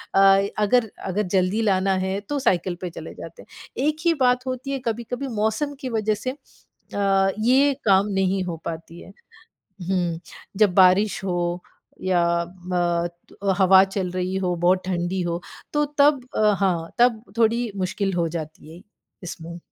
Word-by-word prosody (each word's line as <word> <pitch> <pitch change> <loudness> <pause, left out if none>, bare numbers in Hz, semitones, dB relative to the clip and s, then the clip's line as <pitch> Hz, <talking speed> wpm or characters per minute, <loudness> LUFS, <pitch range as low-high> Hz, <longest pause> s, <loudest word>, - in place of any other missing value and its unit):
अ, 195 0 +5
अगर 225 +1 +2
अगर 195 +3 -1
जल्दी 190 +4 +2
लाना 195 -2 +2
है 190 +1 -2
तो 290 -1 -1
साइकिल 180 -7 +1
पे 180 - -3
चले - - -9
जाते - - -10
हैं। 270 - -7
एक 305 0 0
ही 335 - +5
बात 250 0 +2
होती 255 +2 -4
है 270 - -2
कभी-कभी 235 +4 -3
मौसम 220 +8 0
की 260 -3 -5
वज़ह 215 -2 0
से 255 +5 -4
अ, 195 -7 -2
ये 265 +5 +4
काम 195 0 +4
नहीं 190 0 +1
हो 175 -2 -4
पाती 165 +1 -7
है। - - -13 0.8
हुँ, 175 -3 0 0.4
जब 205 -4 +3
बारिश 190 +1 +4
हो 180 -2 -1 0.6
या 180 -2 +2 0.4
म 175 -1 0 0.2
तु - - -18
अ, - - +5
हवा 190 0 +7
चल 190 -2 -3
रही 185 +1 -2
हो, 180 -2 0
बहुत 180 +2 +2
ठंडी 180 0 -1
हो, 170 0 -2 0.3
तो 295 0 +2
तब 285 -1 +5 0.2
अ, 210 -1 +4
हाँ, 170 -4 0
तब 240 -2 +3 0.2
थोड़ी 230 0 +2
मुश्किल 195 +1 -1
हो 170 -2 0
जाती 155 +1 -10
है 180 - -14 0.4
इसमें। 170 0 -8
195 Hz, 165 wpm, -23 LUFS, 180-225 Hz, 0.8 s, हवा